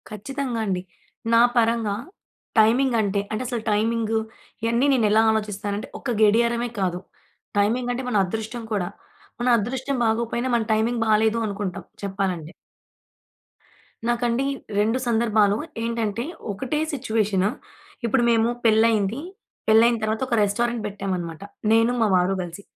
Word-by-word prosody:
కచ్చితంగా 245 +3 -4
అండి. 185 -3 -1 0.5
నా 230 - +7 0.2
పరంగా 225 -3 +2 0.6
టైమింగ్ 240 +4 +4
అంటే, 200 -1 0
అంటే 215 - -2
అసలు 240 -2 -3
టైమింగ్ 225 +1 0 0.5
ఇయన్నీ 235 +3 +2
నేను 240 -4 +3
ఎలా 220 +1 +5
ఆలోచిస్తానంటే, 210 -1 -2
ఒక 250 - -3
గడియారమే 235 +3 +3
కాదు. 180 -2 0 0.6
టైమింగ్ 240 +4 +1
అంటే 255 +2 -4
మన 245 - -2
అదృష్టం 220 +5 -5
కూడా. 190 -4 0 0.5
మన 245 - 0
అదృష్టం 260 +5 -2
బాగోకపోయినా 235 +2 0
మన 235 - +2
టైమింగ్ 230 +2 +1
బాలేదు 220 +1 +3
అనుకుంటాం 195 -3 -4 0.2
చెప్పాలంటే. 190 -5 -2 1.6
నాకండి 240 +2 +1 0.3
రెండు 220 +4 +2
సందర్భాలు. 220 -3 +3 0.3
ఏంటంటే 230 -1 -1 0.3
ఒకటే 265 +9 -2
సిట్యుయేషన్. 215 -7 +1 0.6
ఇప్పుడు 240 +2 +2
మేము 225 0 +3 0.2
పెళ్లయింది. 220 0 +3 0.5
పెళ్లయిన 230 +2 +5
తరువాత, 220 +2 -1
ఒక 245 - +1
రెస్టారెంట్ 235 +3 0
పెట్టామన్నమాట 185 -5 -4 0.3
నేను, 225 +1 +4
మా 225 - +4
వారు 180 +1 +2
కలిసి. 175 +3 -7
220 Hz, 125 wpm, -23 LUFS, 205-235 Hz, 1.6 s, నా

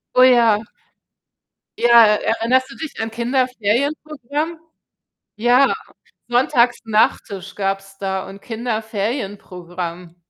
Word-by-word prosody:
Oh 255 - +7
ja. 230 -4 +4 1.1
Ja, 235 -1 +7
erinnerst 230 +4 +1
du - - -11
dich 320 - -7
an 225 0 -3
Kinderferienprogramm? 265 +6 -2 0.8
Ja, 245 +5 +4 0.6
Sonntags 245 -1 +2
Nach-Tisch 205 -3 0
gab's 195 0 -3
da 190 -1 -3
und 195 +1 -11
Kinderferienprogramm. 200 -7 -5
225 Hz, 85 wpm, -20 LUFS, 195-250 Hz, 1.1 s, Oh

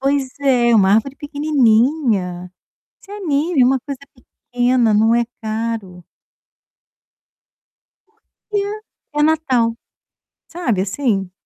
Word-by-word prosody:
Pois 275 0 0
é, 245 -4 +3
uma 195 -2 +4
árvore 270 +5 0
pequenininha. 240 - +1 0.5
Isso 400 - -15
é 415 - -7
mínimo, 300 -5 +1
uma 265 - +1
coisa 275 0 -7 0.5
pequena, 245 -2 +2
não 220 +2 +3
é 235 0 +2 0.2
caro. 220 -5 -4 2.0
Porque. 430 -1 -6 0.5
É 295 - +1
Natal. 285 -7 +2 0.8
Sabe, 285 - -1
assim. 195 -2 -1
250 Hz, 100 wpm, -18 LUFS, 220-290 Hz, 2.0 s, uma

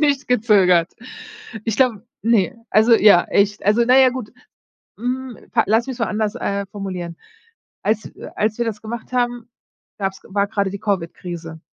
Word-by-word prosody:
nicht 285 -2 +1
gezögert. 195 -8 +3 0.7
Ich 225 -2 -1
glaube 240 -4 +1 0.2
ne, 225 -2 +2 0.2
also 220 +2 +4
ja, 205 -5 +6
echt 205 +1 +1
also 210 +4 +4
na 255 +2 +6
ja, 260 -1 +6
gut 245 -4 -7 0.7
hm, 250 +1 -4 0.3
lass 225 +4 +2
mich's 260 -2 -6
mal 230 - 0
anders, 215 -1 -1
äh, 200 0 -2
formulieren. 185 -4 -6 0.7
Als 215 0 0
w - - -10
als 215 +2 0
wir 235 - +1
das 215 -1 -4
gemacht 235 +2 -7
haben, 245 -1 -1 0.5
gab's 195 -1 -3
war 200 +1 0
grade 200 -3 -1
die 200 - -6
Covid-Krise. 170 -4 -4
215 Hz, 160 wpm, -20 LUFS, 195-240 Hz, 0.7 s, ja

